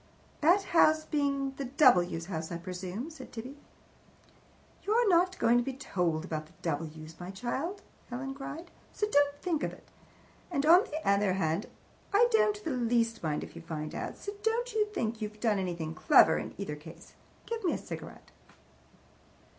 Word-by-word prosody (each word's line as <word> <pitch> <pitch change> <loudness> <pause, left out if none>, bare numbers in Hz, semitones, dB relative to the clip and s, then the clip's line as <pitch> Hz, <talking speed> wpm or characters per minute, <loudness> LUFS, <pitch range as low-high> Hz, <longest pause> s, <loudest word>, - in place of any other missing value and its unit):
"That 355 +6 +4
house 310 -2 +5
being 280 -2 0
the 275 - -3
W.'s 185 - +4
house, 160 -3 -4
I 170 - -2
presume," 185 - -5
said 270 -5 -11
Tibby. 250 +4 -7 1.3
"You're 455 +3 +2
not 365 0 +3
going 235 +1 +4
to - - 0
be 270 - -3
told 175 -10 -1
about 155 -3 -4
the - - -22
W.'s, 155 0 -4
my 175 0 -7
child," 265 - -4 0.3
Helen 270 +2 -4
cried, 295 +5 -8 0.2
"so 420 - -1
don't 285 -8 +4
you - - -24
think 335 -5 0
it. - - -5 0.6
And 290 -5 0
on 350 +7 +7
the 315 -7 -5
other 200 -1 +3
hand, 170 +1 0 0.4
I 415 +4 +6
don't 425 -2 +3
the 325 - -2
least 235 -2 +1
mind 155 -2 -1
if - - -10
you - - -8
find 155 -2 -5
out, - - -5
so 405 - -5
don't 465 +2 0
you 425 -1 +2
think 230 - -3
you've 210 0 -5
done 215 -3 +2
anything 170 -4 -3
clever, 160 0 +6
in - - -7
either 195 -7 -4
case. 155 +2 -13 0.3
Give 460 -1 -4
me 355 - +2
a - - -1
cigarette." - - -9
245 Hz, 175 wpm, -30 LUFS, -, 1.3 s, on